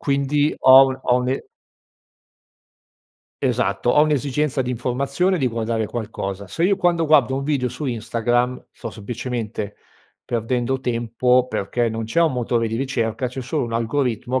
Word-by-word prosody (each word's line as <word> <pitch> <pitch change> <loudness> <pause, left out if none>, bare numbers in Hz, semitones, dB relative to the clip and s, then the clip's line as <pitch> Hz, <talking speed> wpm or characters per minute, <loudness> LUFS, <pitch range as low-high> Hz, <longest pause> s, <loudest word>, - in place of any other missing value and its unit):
quindi 140 +1 +1
ho 130 +1 +8
un 130 0 -3
ho 125 - +3
un 125 0 -1
e 135 - -2 2.0
Esatto, 120 - +1
ho 150 - +5
un'esigenza 145 -1 0
di 125 - -3
informazione, 135 +9 0
di 135 -5 0
guardare 115 -1 -1
qualcosa. 100 -4 -5
Se 165 - -2
io, 200 +2 +4
quando 175 -3 +2
guardo 140 -4 +4
un 135 - -2
video 140 -4 0
su 125 +5 -7
Instagram, 120 +1 -1
sto 115 - -7
semplicemente 110 -1 -5 0.5
perdendo 120 +3 -1
tempo, 125 +1 +1
perché 120 +1 -1
non 110 0 -4
c'è 165 +10 +1
un 160 -4 +2
motore 120 -2 0
di 110 0 -3
ricerca, 125 -2 -1
c'è 130 +1 -6
solo 130 +3 -2
un 115 - -5
algoritmo 120 +1 -1
125 Hz, 155 wpm, -21 LUFS, 115-140 Hz, 2.0 s, ho